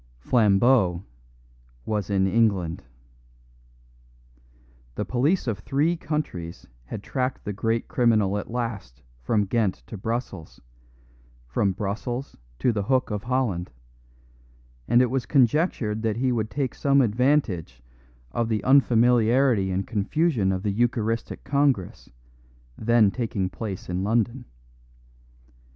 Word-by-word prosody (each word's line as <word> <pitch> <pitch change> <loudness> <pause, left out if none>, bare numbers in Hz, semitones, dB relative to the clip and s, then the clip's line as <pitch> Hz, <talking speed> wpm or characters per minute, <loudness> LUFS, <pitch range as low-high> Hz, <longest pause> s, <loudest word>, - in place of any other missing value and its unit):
Flambeau 100 - +3 0.8
was 105 -2 -2
in 95 -1 +2
England. 95 -5 +1 2.1
The - - -2
police 140 +10 +1
of 110 -5 -2
three 145 +10 0
countries 145 - -4 0.2
had 100 - -7
tracked 130 -1 -3
the 105 - -3
great 115 +3 -1
criminal 110 -8 +2
at - - -8
last 105 - -5 0.2
from 105 - +1
Ghent 105 -1 0
to 110 - -8
Brussels, 115 -7 -5 0.9
from 95 - 0
Brussels 115 +7 -4 0.2
to 120 - +2
the 105 -3 -1
Hook 130 +4 0
of 105 0 -4
Holland; 120 -9 -1 1.2
and 120 +1 +5
it 125 - -1
was 130 -2 -1
conjectured 125 - +2
that 110 -1 -1
he 130 +1 +1
would 110 -3 -1
take 130 +2 -2
some 140 0 +3
advantage 110 - 0 0.5
of 115 -1 -1
the 110 -2 -1
unfamiliarity 120 -4 +4
and 95 +1 -1
confusion 115 - 0
of 95 0 -3
the 105 - 0
Eucharistic 115 +1 -1
Congress, 140 -9 0 0.7
then 110 -2 +3
taking 100 -6 -2
place 95 0 -6
in 90 +1 -2
London. 120 +4 0
115 Hz, 120 wpm, -25 LUFS, 100-125 Hz, 2.1 s, and